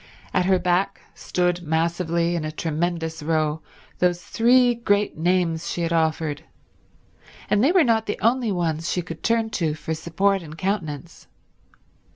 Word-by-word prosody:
At 180 -1 +2
her 190 -1 +4
back 180 +2 0
stood 180 -1 -1
massively 170 +1 0
in 165 - -2
a 155 - -3
tremendous 160 +1 -2
row 155 0 0 0.4
those 175 -1 +2
three 245 +1 +4
great 205 -3 0
names 170 0 0
she 175 - -3
had 165 0 -1
offered, 160 -2 0 1.1
and 210 +2 +4
they 285 - +5
were 365 -2 +5
not 225 -3 +2
the 205 - -2
only 235 0 +2
ones 165 -3 -1
she 180 - -1
could 165 -2 -8
turn 230 -1 +1
to 160 -7 -1
for 160 +1 -4
support 190 +5 0
and 160 -1 -10
countenance. 170 -5 -4
175 Hz, 155 wpm, -23 LUFS, 160-200 Hz, 1.1 s, they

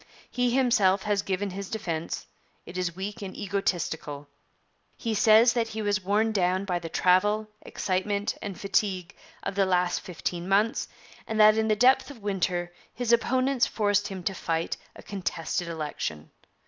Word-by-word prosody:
He 250 0 +1
himself 235 -7 +3
has 205 -1 +1
given 195 0 -2
his 195 +1 -6
defence; 170 -7 -3 0.4
it 175 - -10
is 180 -2 -2
weak 205 +4 -5
and 195 -2 -7
egoistical. 170 -7 -2 0.7
He 230 -2 -2
says 220 +2 +6
that 235 -2 0
he 220 0 -5
was 205 -1 0
worn 210 +4 +2
down 185 -1 +1
by 180 -2 -1
the 165 -1 -7
travel, 205 +6 +3
excitement, 200 +2 -1
and 200 -4 -6
fatigue 195 -3 -1 0.3
of 195 - -2
the 195 0 +2
last 180 -1 +2
fifteen 175 0 -4
months, 210 +4 +2 0.4
and 220 0 -2
that 215 0 +8
in 220 0 +1
the 215 - +3
depth 250 +7 +4
of 245 -7 -12
winter 180 -3 -1 0.2
his 240 -1 0
opponents 255 +2 +2
forced 205 -1 +1
him 190 -2 -7
to 195 - -1
fight 165 -2 -2 0.2
a - - -12
contested 175 -3 -3
election. 150 - -4
200 Hz, 160 wpm, -27 LUFS, 180-215 Hz, 0.7 s, that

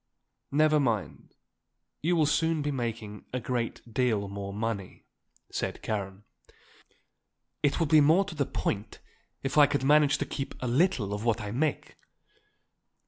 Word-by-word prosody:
"Never 155 +1 +4
mind, 115 -8 -2 0.7
you 175 +3 +2
will 160 -2 +3
soon 160 +1 +1
be 145 - -1
making 115 -5 -4
a 125 - -2
great 120 -1 -3
deal 110 -5 +1
more 100 0 -6
money," 105 -2 -4 0.5
said - - -3
Karen. 100 -2 -4 1.4
"It 145 +3 +1
would 165 -3 +1
be 155 0 +7
more 160 +7 +5
to 190 - -7
the 145 -3 -1
point 105 0 -3 0.5
if 135 +2 +1
I 145 - +8
could 140 -1 -1
manage 145 +1 +5
to - - -2
keep 135 - -5
a 130 - -3
little 125 - +1
of 105 +1 -4
what 115 -1 +1
I 105 -2 -5
make. 145 +5 -2
130 Hz, 150 wpm, -28 LUFS, 105-150 Hz, 1.4 s, I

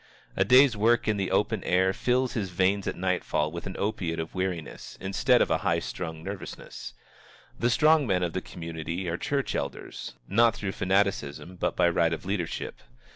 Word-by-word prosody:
A 95 - +3
day's 125 +4 +6
work 115 +3 +3
in 105 -1 +2
the 95 -2 -1
open 105 +2 +1
air 95 +1 +2
fills 125 +4 +1
his 100 -5 -2
veins 95 +3 +1
at - - -1
nightfall 90 -4 0
with 85 +2 -6
an 95 - -6
opiate 95 -6 -2
of 80 0 -5
weariness 90 -4 -4
instead 95 +1 +3
of - - -3
a - - +2
high - - +1
strung 80 +6 -5
nervousness. 95 -10 -7 0.6
The 120 - +2
strong 155 +2 +4
men 90 -3 +1
of 85 - -1
the 95 - -2
community 85 +2 -5
are 85 0 -1
church 140 +5 -1
elders, 70 -1 -5
not 115 +3 +4
through 100 -2 -3
fanaticism, 95 -4 0
but - - -1
by - - +4
right 85 -1 +2
of 80 - -5
leadership. 95 -3 -3
95 Hz, 180 wpm, -27 LUFS, 85-105 Hz, 0.6 s, day's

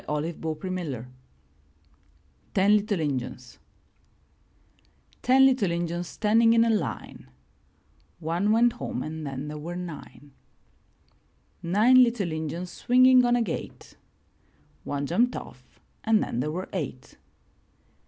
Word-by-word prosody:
344 155 +2 -3
IN 185 - -2
THE 180 - -3
NURSERY 130 -7 -5 1.5
TEN 200 +2 +5
LITTLE 205 -2 0
INJUNS 130 -4 -4 1.6
Ten 265 +2 +5
little 255 -8 +3
Injuns 170 0 -3
standing 225 +2 +3
in 230 0 +4
a 230 - +2
line 190 - -4 0.5
— - - -38
One 200 +5 +1
went 235 +1 +4
home 180 - -5
and 155 -1 -6
then 135 +1 -5
there 150 0 -6
were 170 +4 -6
nine. 165 -4 -9 1.3
Nine 220 +9 +5
little 235 -8 +1
Injuns 160 +3 -4
swinging 255 +1 +5
on 240 0 +3
a 240 - +2
gate 185 - -7 0.4
— - - -36
One 145 0 -3
jumped 235 - +1
off - - -11 0.2
and 220 -1 +3
then 120 - -4
there 145 +4 -1
were 180 +5 -4
eight. 145 -8 -6
180 Hz, 130 wpm, -26 LUFS, 155-225 Hz, 1.6 s, TEN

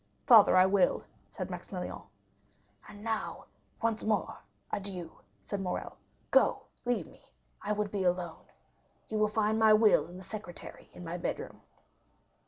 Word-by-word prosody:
"Father, 220 -6 +8
I 185 - +7
will," 190 -1 +3 0.3
said - - -6
Maximilian. - - -6 0.9
"And 205 0 -11
now, 225 -1 -3 0.4
once 225 -1 0
more, 210 -5 0 0.3
adieu," 190 -4 -4 0.3
said 200 -1 -4
Morrel. 180 -2 -4 0.4
"Go, - - +4 0.2
leave 245 0 0
me; - - -18 0.4
I 210 - -3
would 210 -1 -1
be 200 -2 -1
alone. 180 -2 -1 0.6
You 215 - -1
will 215 - +4
find 215 +1 +1
my 220 -1 +7
will 215 0 +5
in 175 - -10
the 185 - -9
secretaire 205 -4 -8
in 180 - -10
my 170 +2 -4
bedroom." - - -4
205 Hz, 145 wpm, -31 LUFS, 185-215 Hz, 0.9 s, Father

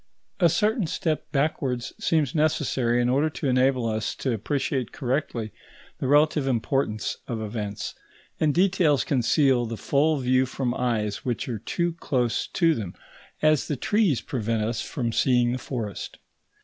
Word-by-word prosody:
A 175 -3 +5
certain 210 - +1
step 155 -1 -2
backwards 135 -4 -1
seems 155 -2 +1
necessary 135 -6 +1
in - - +1
order 140 +5 +2
to 145 - -4
enable 130 -1 +2
us 110 -1 -1
to 130 - -1
appreciate 130 +2 -2
correctly 125 -5 -2 0.5
the - - -2
relative 150 0 +3
importance 115 -3 -1
of 115 -2 -3
events, 105 -1 -4 0.5
and 155 -2 +3
details 175 -4 +3
conceal 130 -1 +2
the 115 0 -5
full 150 +6 +2
view 130 0 +2
from 130 -1 -2
eyes 110 -5 -1
which 120 -3 -2
are 115 -4 -3
too 170 - -1
close 125 -4 0
to 165 -2 +2
them, 105 - -5 0.5
as 155 -2 +3
the 145 - -2
trees 195 - +2
prevent 115 -3 -2
us 115 +1 -1
from 120 -6 -3
seeing 120 0 +3
the 130 - -2
forest. 115 -7 -5
130 Hz, 150 wpm, -25 LUFS, 115-150 Hz, 0.5 s, A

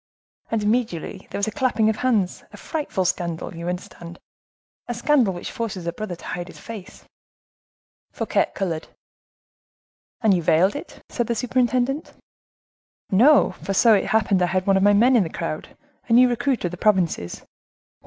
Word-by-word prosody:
And 225 -2 -1
immediately 215 -6 -2
there - - -5
was 200 - 0
a - - -2
clapping 230 -1 +1
of 220 -1 +1
hands. 220 -8 0
A - - -12
frightful 295 - -3
scandal! 170 -2 -2
you 170 +1 -4
understand; 175 -1 -7 0.7
a 240 - -3
scandal 245 -3 +3
which 175 -1 -6
forces 220 -7 -4
a 170 - -2
brother 190 -1 -5
to - - -14
hide 175 0 -5
his - - -12
face." 215 -5 -10 1.1
Fouquet - - 0
colored. 170 -5 -3 1.3
"And 220 -4 +4
you 180 - +1
veiled 170 - +3
it?" 290 - -9
said 240 -2 -2
the 235 - 0
superintendent. 255 +4 0 1.0
"No, 265 +10 +5
for 195 - -3
so 230 +3 +6
it 200 - +2
happened 210 -4 +2
I 180 - +3
had 185 +1 -1
one 195 - +3
of 190 - +3
my 205 +1 +5
men 240 +6 +5
in 235 - +5
the 170 - -2
crowd; 155 -1 -5 0.3
a - - +3
new 250 +2 +7
recruit 245 +2 0
from 175 - -2
the 180 - -7
provinces, 175 - 0
one - - -24
M. - - -43
205 Hz, 180 wpm, -23 LUFS, 180-240 Hz, 1.3 s, new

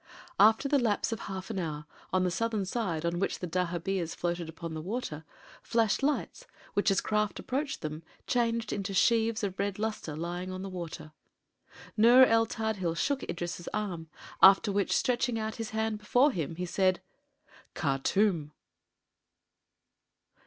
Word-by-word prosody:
After 220 +6 +6
the 280 0 +3
lapse 225 -3 0
of 225 - -3
half 190 +1 -6
an 200 - -3
hour, 150 -3 -4 0.3
on 185 0 +2
the 180 - +1
southern 215 +2 -1
side, 185 -6 -2
on 170 +1 0
which 195 - -1
dahabeahs 180 0 -2
floated 175 -1 -2
upon 165 0 -7
the 155 - -4
water, 170 -5 -4 0.4
flashed 225 -1 +1
lights 300 - -1 0.3
which, 205 - +2
as 195 - +2
crafts 210 -3 0
approached 275 +3 -3
them, 155 +1 -5 0.2
changed 230 -2 0
into 200 -1 -3
sheaves 225 +1 +3
of 190 -2 -3
red 200 -1 -1
luster 215 -8 -3
lying 175 +3 -4
on 185 0 -5
the 195 - -5
water. 170 -4 -7 0.8
Nur 240 +4 +7
el 225 -1 +3
Tadhil 210 -7 -2
shook 280 +6 0
Idris' 175 0 -4
arm, 185 -6 -3 0.3
after 195 +1 +7
which, 200 -1 +1
stretching 240 -1 +1
out 220 0 -3
his 225 -2 -4
hand 220 -1 -1
before 250 +7 +3
him, 165 - -3
he 180 +2 -3
said: 185 0 +1 0.8
"Khartûm!" 155 +3 +1
195 Hz, 150 wpm, -30 LUFS, 175-225 Hz, 0.8 s, Nur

